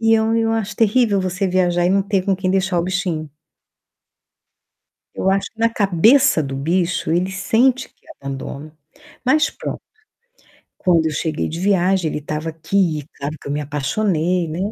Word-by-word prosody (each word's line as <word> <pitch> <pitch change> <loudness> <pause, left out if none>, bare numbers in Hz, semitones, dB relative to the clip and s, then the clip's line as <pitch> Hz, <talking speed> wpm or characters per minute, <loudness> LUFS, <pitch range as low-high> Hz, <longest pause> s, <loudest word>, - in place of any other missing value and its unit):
e 225 0 +3
eu 220 0 +2
eu 225 0 +1
acho 210 -3 -2
terrível 220 -2 +3
você 185 +1 -1
viajar 175 -1 +2
e - - +2
não 195 0 +3
ter 195 -1 0
com 195 - +2
quem 185 -1 -1
deixar 185 -2 +1
o - - +1
bichinho. 180 -5 -2 1.8
Eu 190 - 0
acho 195 0 0
que 225 - -33
na 230 0 +3
cabeça 215 - +4
do 135 -1 -5
bicho, 170 +3 0
ele 180 +3 +1
sente 240 +7 +1
que - - -35
é - - -16
abandono, 140 +2 -7 0.5
mas 305 +5 +3
pronto. - - -6 1.0
Quando 170 -3 +2
eu 155 - -1
cheguei 155 +1 -2
de 165 +2 -5
viagem 190 -3 +2
ele - - -3
estava 150 +2 -4
aqui 165 0 0
e 145 - -15
claro 145 +3 -5
que - - -15
eu - - -2
me 150 - -1
apaixonei, 165 +4 -1
né, 160 +3 -5
185 Hz, 180 wpm, -20 LUFS, 160-205 Hz, 1.8 s, cabeça